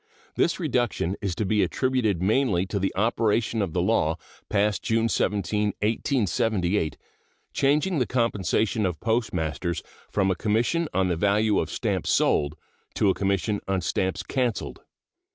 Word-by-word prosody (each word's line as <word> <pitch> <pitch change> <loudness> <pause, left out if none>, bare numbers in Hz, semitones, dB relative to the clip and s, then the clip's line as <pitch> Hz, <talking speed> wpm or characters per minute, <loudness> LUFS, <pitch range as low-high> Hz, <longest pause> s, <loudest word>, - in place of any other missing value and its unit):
This - - +1
reduction 120 -6 0
is 95 -4 -2
to 110 - -1
be 105 +2 +2
attributed 120 -9 0
mainly 105 -4 +2
to 100 +1 -3
the 95 - 0
operation 110 +1 +1
of 95 -5 -2
the - - +1
law - - +1 0.3
passed 105 0 +1
June 115 0 +1
17, 105 -1 0
1878, 105 - 0 0.6
changing 150 +5 +2
the 125 - +1
compensation 110 -3 +1
of 90 -3 -4
postmasters 90 - -1 0.3
from 95 -2 +1
a - - 0
commission 115 - +1
on 95 0 +1
the 90 - 0
value 100 +4 +2
of - - -2
stamps - - -2
sold 75 +1 +2 0.4
to 100 - +3
a - - 0
commission 100 +2 0
on 95 -1 +1
stamps 95 +3 -1
canceled. 125 -5 -2
105 Hz, 145 wpm, -25 LUFS, 95-115 Hz, 0.6 s, to